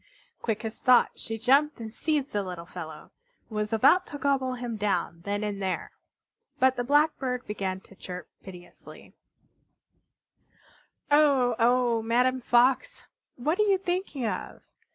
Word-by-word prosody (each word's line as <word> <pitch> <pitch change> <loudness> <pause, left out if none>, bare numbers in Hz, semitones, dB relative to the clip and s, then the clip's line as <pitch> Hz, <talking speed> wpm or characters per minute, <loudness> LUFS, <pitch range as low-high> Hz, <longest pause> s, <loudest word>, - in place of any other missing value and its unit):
Quick 225 0 -2
as 220 - -6
thought 250 -2 +5
she 225 - -5
jumped 275 +5 +3
and 220 -1 -7
seized 295 -2 -1
the 205 - +1
little 180 -3 -7
fellow, 160 -3 -9 0.4
and 220 - -10
was 210 0 -2
about 225 - +4
to 290 - -7
gobble 265 -2 0
him 240 -2 -5
down 195 -5 -1
then 205 +1 -2
and 205 -1 -3
there. 190 -1 -3 0.7
But 260 0 +3
the 245 - -2
Blackbird 275 -2 +1
began 190 -2 -3
to - - -18
chirp 180 -2 -8
piteously: 180 -2 -13 2.0
"Oh, 280 -5 +4
oh, 240 -1 +3
Madame 250 +3 +1
Fox! 250 +2 +2 0.3
What 305 - -1
are 425 - +3
you 395 -1 +4
thinking 360 -8 -3
of? - - -4
240 Hz, 145 wpm, -27 LUFS, 210-270 Hz, 2.0 s, thought